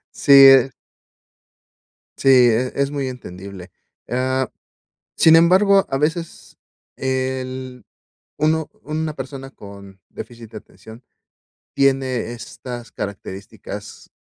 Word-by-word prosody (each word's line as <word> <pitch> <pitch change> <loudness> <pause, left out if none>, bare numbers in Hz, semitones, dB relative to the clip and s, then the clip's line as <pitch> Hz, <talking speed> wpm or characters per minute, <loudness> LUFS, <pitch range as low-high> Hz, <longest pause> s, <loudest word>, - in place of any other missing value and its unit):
Sí, 140 -1 +7
eh 135 0 +6 1.5
Sí, 135 - 0
e 125 -1 +4
es 140 0 -1
muy 140 -2 -3
entendible. 95 -6 -10 0.4
Ah, 130 +1 -1 0.7
sin 160 0 +6
embargo, 195 +4 +4
a 135 0 -2
veces 165 +3 -4 0.4
el, 130 -2 -4 0.5
uno 155 +1 0
una 155 0 -4
persona 135 -1 -8
con 100 -4 -14
déficit 115 -2 -11
de - - -7
atención 110 +3 -16 0.7
tiene 135 -3 0
estas 120 0 -9
características 100 -1 -8
130 Hz, 95 wpm, -20 LUFS, 120-140 Hz, 1.5 s, Sí